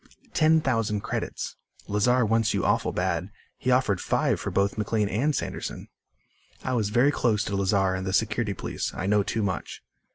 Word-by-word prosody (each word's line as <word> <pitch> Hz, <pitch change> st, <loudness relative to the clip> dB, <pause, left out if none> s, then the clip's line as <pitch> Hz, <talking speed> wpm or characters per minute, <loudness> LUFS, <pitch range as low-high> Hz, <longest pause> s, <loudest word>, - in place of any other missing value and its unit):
Ten 160 Hz, 0 st, +4 dB
thousand 115 Hz, -6 st, 0 dB
credits. -, -, -4 dB, 0.3 s
Lazar 115 Hz, +4 st, +3 dB
wants 115 Hz, 0 st, +2 dB
you -, -, 0 dB
awful -, -, +2 dB
bad. 90 Hz, 0 st, -1 dB, 0.3 s
He 130 Hz, -, -2 dB
offered 125 Hz, -7 st, +2 dB
five -, -, +1 dB
for -, -, -3 dB
both 100 Hz, 0 st, +1 dB
McLean 105 Hz, -1 st, 0 dB
and 140 Hz, +9 st, 0 dB
Sanderson." -, -, -4 dB, 0.7 s
"I 130 Hz, -, -1 dB
was 110 Hz, -4 st, +1 dB
very 125 Hz, +6 st, +4 dB
close 110 Hz, -6 st, +1 dB
to 100 Hz, -, -3 dB
Lazar 95 Hz, -1 st, +2 dB
in 95 Hz, 0 st, -3 dB
the 95 Hz, -, -2 dB
Security 110 Hz, +1 st, 0 dB
Police. -, -, -4 dB
I 95 Hz, -, -3 dB
know 105 Hz, +1 st, +3 dB
too 110 Hz, +2 st, -1 dB
much." 95 Hz, -5 st, -4 dB
105 Hz, 175 wpm, -26 LUFS, 100-120 Hz, 0.7 s, Ten